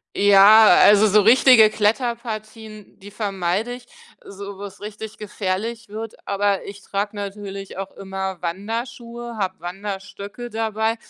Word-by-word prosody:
Ja, 205 +2 +7 0.2
also, 210 +1 +6
so 210 +1 +4
richtige 230 0 +6
Kletterpartien, 220 -1 -3
die 205 +1 -12
vermeide 200 +2 -2
ich, 245 0 -11 0.4
so 200 0 -9
wo's 200 0 -10
richtig 215 +1 -8
gefährlich 210 +2 -4
wird, 220 +1 -7
aber 200 -1 0
ich 200 0 -10
trage 205 +2 -4
natürlich 200 -1 -7
auch 195 0 -6
immer 190 -2 -6
Wanderschuhe, 235 +5 -6
habe 190 -5 -3
Wanderstöcke 200 +5 -7
dabei. 220 0 -1
205 Hz, 125 wpm, -21 LUFS, 195-225 Hz, 0.4 s, Ja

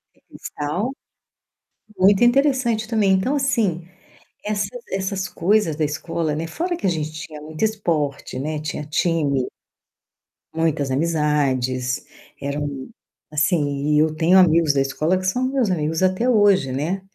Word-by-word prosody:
É, - - -30
cristal 175 - -4 1.1
muito 195 +3 +5
interessante, 240 -3 +3
também. 210 -4 +2
Então, 190 +10 +1
assim, 210 - 0 0.6
essa 205 -1 -1 0.2
essas 190 0 -2
coisas 185 -3 +1
da 155 - -1
escola, 155 +1 -2
né, 165 +2 -3
fora 345 - -3
que 200 - -5
a - - +4
gente 155 -2 -2
tinha 155 -1 -8
muito 155 +5 -6
esporte, 155 -11 -2
né, 150 +2 -3
tinha 150 -1 -5
time. 150 -4 0 1.1
Muitas 155 -4 0
amizades 135 -5 0 0.3
eram, 140 -1 -4 0.4
assim, 150 -2 +1
e - - +4
eu 155 0 +2
tenho 170 +4 +4
amigos 165 -4 +5
da 135 - +2
escola 155 +7 0
que 185 - -5
são 250 +7 0
meus 255 -8 +1
amigos 160 +1 -1
até 185 +7 +2
hoje, 200 - +4
né, 165 +9 -2
165 Hz, 140 wpm, -21 LUFS, 150-200 Hz, 1.1 s, muito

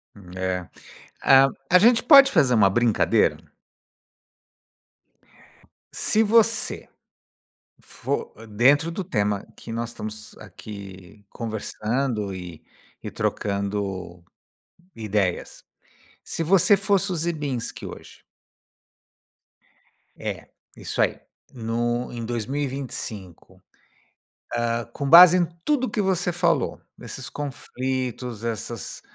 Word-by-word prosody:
Hum, 95 -4 -14
é. 90 -1 -3 0.5
A 135 0 +7 0.2
a 180 - +7
gente 235 +4 +5
pode 275 -2 +8
fazer 140 -8 +3
uma 105 -4 +5
brincadeira? 115 +2 +2 2.6
Se 220 - +2
você, 225 +1 +2 0.9
for - - -4
dentro 140 +10 +3
do 195 - -4
tema 105 - -1
que 115 - -9
nós 115 0 -3
estamos 110 -2 -8
aqui 100 -1 -11
conversando 110 0 -3
e 90 -3 -9 0.4
e - - -6
trocando 100 -3 -3 0.7
ideias. 105 -5 -2 0.6
Se - - -4
você 185 +4 +5
fosse 195 0 +1
o - - -2
Ziembinski 150 -7 -3
hoje? - - -12 2.0
É, - - -6 0.3
isso - - -2
aí. - - +1 0.3
No 120 +1 -2
em 120 -1 -6
2025, 120 - -5 1.0
hã, 115 0 -1
com 140 +4 -5
base 175 +2 +10
em 175 - +2 0.2
tudo 280 -4 +1
o - - -5
que 215 - -1
você 185 -2 0
falou, 170 -5 0 0.2
nesses - - -8
conflitos, 130 -4 -4
essas, 115 0 -5
120 Hz, 100 wpm, -24 LUFS, 105-165 Hz, 2.6 s, base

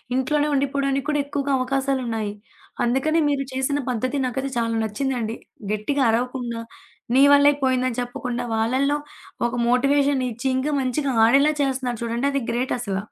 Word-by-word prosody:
ఇంట్లోనే 295 +3 +1
ఉండిపోడానికి 275 0 0
కూడా 295 -1 +1
ఎక్కువుగా 285 -1 -2
అవకాశాలున్నాయి. 255 -5 -1 0.5
అందుకని 270 +7 +1
మీరు 275 -1 0
చేసిన 265 +2 0
పద్ధతి 255 +4 -1
నాకైతే 265 +2 -3
చాలా 230 -1 0
నచ్చిందండి. 230 0 -2 0.4
గెట్టిగా 260 +7 0
అరవకుండా, 240 -1 -2 0.5
నీ 270 - +7
వల్లే 285 0 +6
పోయిందని 255 -2 +1
చెప్పకుండా, 245 0 -4
వాళ్ళళ్ళో 260 +6 +1 0.5
ఒక - - -6 0.2
మోటివేషన్‌ 275 +1 +2
ఇచ్చి 240 +4 -4
ఇంకా 295 +3 -1
మంచిగా 270 +2 -1
ఆడేలా 280 +6 +4
చేస్తన్నారు 255 -3 -2
చూడండి, 235 +4 -1
అది 275 - 0
గ్రేటసల. 240 -4 -2
260 Hz, 135 wpm, -23 LUFS, 240-280 Hz, 0.5 s, నీ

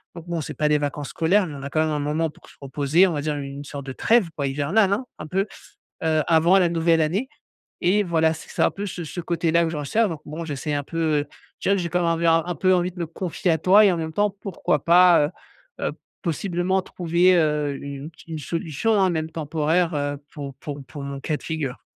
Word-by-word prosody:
Donc 170 0 -10
bon, 170 -2 -2
c'est - - -6
pas 150 - +1
des 150 - +4
vacances 145 0 -3
scolaires, 185 +5 +2
mais 150 - -7
on 140 - -8
a 140 - -4
quand 155 - -1
même 160 - +1
un 150 - -1
moment 150 +3 0
pour - - -19
se - - -18
reposer, 145 +5 +3
on - - -1
va 145 - -2
dire 150 0 -2
une 140 0 -6
sorte 140 -1 -7
de 135 - -5
trêve, 225 - +3
quoi, 140 -2 -1
hivernale, 155 +10 +2
hein, 255 +6 -2
un 155 - -6
peu, 190 +5 0 0.6
heu, 155 -1 +2
avant 170 +3 +5
la 180 -2 +3
nouvelle 165 -1 +2
année 195 +12 0 0.6
et 205 +3 +4
voilà, 160 -2 +2
c 160 - -11
c'est - - -3
un - - +3
peu 200 +1 -5
ce 175 -2 -5
ce 160 - -6
côté-là 170 0 +1
que - - -1
je 160 - -4
recherche, 210 +10 +1
donc 160 -3 -6
bon 160 +3 -6
j'essaie 150 0 -3
un 145 0 -1
peu, 165 - -7 0.2
heu, 145 - -8 0.3
je - - -15
dirai 200 - +5
que 185 - -1
j'ai 170 - -3
quand 180 +2 +1
même 170 - +1
envie 165 0 0
un 165 0 +5
un 175 -1 -3
peu 185 +5 +3
envie 180 0 +1
de 180 - -12
me 170 - -2
confier 175 +1 -2
à 160 - +2
toi 195 +6 +6
et 195 - +5
en 175 - -1
même 160 -1 -4
temps 205 +3 +2
pourquoi 165 -6 -1
pas, 175 -2 +6 0.5
heu - - -1
heu, - - -1 0.3
possiblement 180 +2 0
trouver, 180 +1 +2
heu, 150 -3 +1
une 140 +1 -7
ti 165 +1 -15
une 155 - -4
solution, 165 +6 -1
hein, 190 - +4
même 160 -2 -2
temporaire, 160 +2 0
heu, 145 0 -1 0.2
pour 140 -3 -7
pour 145 +1 -7
pour 140 +2 -8
mon 140 0 -5
cas 150 +3 -2
de - - -18
figure. 150 -5 -4
160 Hz, 255 wpm, -23 LUFS, 150-175 Hz, 0.6 s, toi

